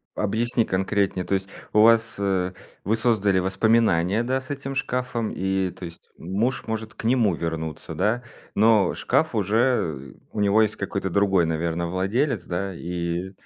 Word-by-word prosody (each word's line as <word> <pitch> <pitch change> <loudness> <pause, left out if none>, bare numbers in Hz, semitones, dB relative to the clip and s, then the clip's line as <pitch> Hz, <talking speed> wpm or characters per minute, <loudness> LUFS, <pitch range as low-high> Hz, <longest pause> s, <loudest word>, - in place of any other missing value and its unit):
объясни 115 +3 0
конкретнее. 95 -1 0
То - - -2
есть 95 0 -1 0.2
у 105 - +5
вас, 115 0 +4
э, 95 -2 0 0.3
вы 110 +4 +1
создали 105 -5 +2
воспоминания, 95 0 +2
да, 130 +2 0
с 130 - -8
этим 135 -1 -5
шкафом? 125 -4 -2
И 95 -1 -1
то 90 - -9
есть 85 0 -12
муж 105 +9 -2
может 110 0 -4
к - - -10
нему 115 -5 +3
вернуться, 80 -2 -4
да? 120 +4 0 0.3
Но 105 -2 +4
шкаф 155 +4 0
уже, 105 -1 0
э, 80 - 0 0.2
у - - -4
него 105 +2 +4
есть 110 0 +1
какой-то 100 -1 -3
другой, 95 -2 +3
наверно, 85 +1 -1
владелец, 105 - 0
да, 95 +2 -3
и 85 +1 -3
100 Hz, 160 wpm, -24 LUFS, 90-115 Hz, 0.3 s, у